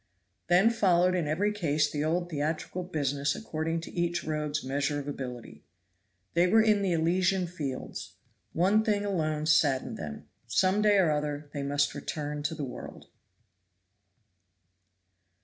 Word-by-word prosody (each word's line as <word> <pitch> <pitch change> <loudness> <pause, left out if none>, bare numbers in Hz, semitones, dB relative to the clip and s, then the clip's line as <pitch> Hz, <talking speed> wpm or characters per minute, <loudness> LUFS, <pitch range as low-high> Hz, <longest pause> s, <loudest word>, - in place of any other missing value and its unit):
Then 185 +6 +5
followed 185 -5 +3
in 175 -4 0
every 190 +8 +1
case 155 -7 +1
the 145 0 -2
old 175 +3 -1
theatrical 155 +4 -2
business 145 -5 -1
according 165 -5 -3
to - - -9
each 175 0 -1
rogue's 150 -1 -2
measure 140 +2 -1
of 140 - -7
ability. 125 -4 -7 0.7
They 175 +1 +4
were 220 +5 +5
in 210 -2 +3
the 195 -2 +1
Elysian 180 +3 +2
fields; 150 -7 -6 0.4
one 195 +6 +3
thing 205 -2 0
alone 155 -6 -1
saddened 150 -4 +2
them; 75 -2 -7 0.2
some 190 - +2
day 210 -1 +4
or 180 -5 +4
other 150 -1 -3
they 145 - -3
must 145 +1 +1
return 150 -1 -4
to 150 +3 -2
the 145 - -3
world. 125 - -9
160 Hz, 145 wpm, -29 LUFS, 145-185 Hz, 0.7 s, Then